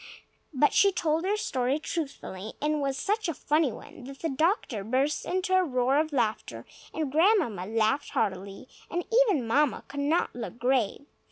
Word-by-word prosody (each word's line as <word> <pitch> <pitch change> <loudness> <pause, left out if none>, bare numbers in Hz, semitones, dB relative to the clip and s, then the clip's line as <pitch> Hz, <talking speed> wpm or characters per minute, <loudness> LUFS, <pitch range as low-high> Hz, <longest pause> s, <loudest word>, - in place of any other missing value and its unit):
But 295 0 +3
she 400 0 +5
told 325 -2 0
her 410 +2 +1
story 260 -7 0
truthfully; 275 - -5
and 300 +1 0
it - - 0
was 275 -2 -1
such 415 +6 -1
a 325 - -3
funny 300 -1 +1
one 245 - -11
that 275 +1 -9
the 325 - 0
doctor 275 - 0
burst 265 +7 0
into 370 +1 -1
a 370 - +4
roar 260 -2 +1
of 310 0 -1
laughter, 215 - -2 0.3
and 310 -4 -3
Grandmamma 310 - +2
laughed 225 +6 +1
heartily, 195 +2 -3 0.2
and 350 +1 -2 0.2
even 295 - +1
Mamma 280 +5 +1
could 285 - -7
not 300 +5 +1
look 235 -1 -6
grave. 250 +1 0
280 Hz, 175 wpm, -28 LUFS, 240-320 Hz, 0.3 s, she